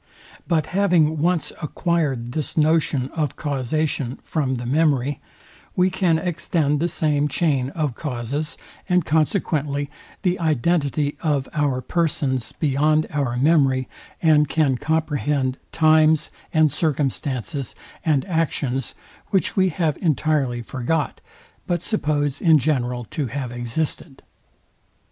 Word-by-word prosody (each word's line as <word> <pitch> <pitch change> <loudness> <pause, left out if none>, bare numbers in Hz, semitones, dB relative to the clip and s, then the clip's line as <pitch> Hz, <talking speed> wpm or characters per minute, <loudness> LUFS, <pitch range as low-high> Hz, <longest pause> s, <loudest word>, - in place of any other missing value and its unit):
But 160 -4 +2
having 170 -6 +3
once 170 +1 +1
acquired 150 -7 -1
this 155 +3 -3
notion 155 -4 +2
of 150 -4 -2
causation 140 -2 -1
from 140 -5 -1
the 120 0 -5
memory, 145 -1 +1 0.5
we 185 +1 +3
can 180 -3 +2
extend 160 -3 0
the 170 - +1
same 150 -3 +1
chain 140 -4 +1
of 150 -6 -1
causes, 140 +3 -3 0.3
and 180 -2 +3
consequently 150 -3 0 0.3
the 180 -1 +1
identity 150 -2 +1
of 145 -4 0
car 145 -4 0
persons 135 -6 -1
beyond 155 +1 +2
our 140 -5 -1
memory, 135 -2 +3 0.4
and 150 -2 +5
can 150 -5 +2
comprehend 145 -2 0
times, 155 -1 +4 0.2
and 155 -2 +4
circumstances, 140 -2 -2 0.3
and 150 -5 +2
actions, 145 -7 -1 0.3
which 190 - 0
we 190 -1 +3
have 160 -2 -1
entirely 145 -6 +1
forgot, 130 +6 -2 0.5
but 175 -2 -1
suppose 145 - -1
in 160 -2 +6
general 125 -4 0
to 145 -4 -2
have 130 0 -4
existed. 130 +4 -4
150 Hz, 115 wpm, -22 LUFS, 135-160 Hz, 0.5 s, in